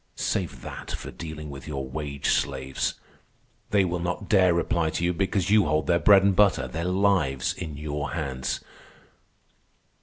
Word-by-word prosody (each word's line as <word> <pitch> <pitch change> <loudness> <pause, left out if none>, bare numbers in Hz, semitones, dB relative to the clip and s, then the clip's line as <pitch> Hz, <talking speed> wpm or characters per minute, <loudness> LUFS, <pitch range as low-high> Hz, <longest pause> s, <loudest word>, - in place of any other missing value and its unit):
Save - - -2
that - - -8
for - - -5
dealing 75 -2 -7
with 70 +1 -9
your 70 -3 -4
wage 70 0 -3
slaves. 65 -1 -1 0.7
They 100 -2 +3
will 90 0 -2
not 90 +3 -3
dare 95 -3 +5
reply 85 -1 +1
to 85 - -3
you 90 +1 +2
because 95 +1 0
you 105 -3 +5
hold 75 +1 +1
their 85 0 +3
bread 100 0 +6
and 100 -1 +3
butter, 100 0 +3
their 85 +2 -4
lives, 90 -8 +1
in 75 -3 -6
your 75 0 -3
hands. 65 -5 -3
85 Hz, 160 wpm, -26 LUFS, 70-95 Hz, 0.7 s, bread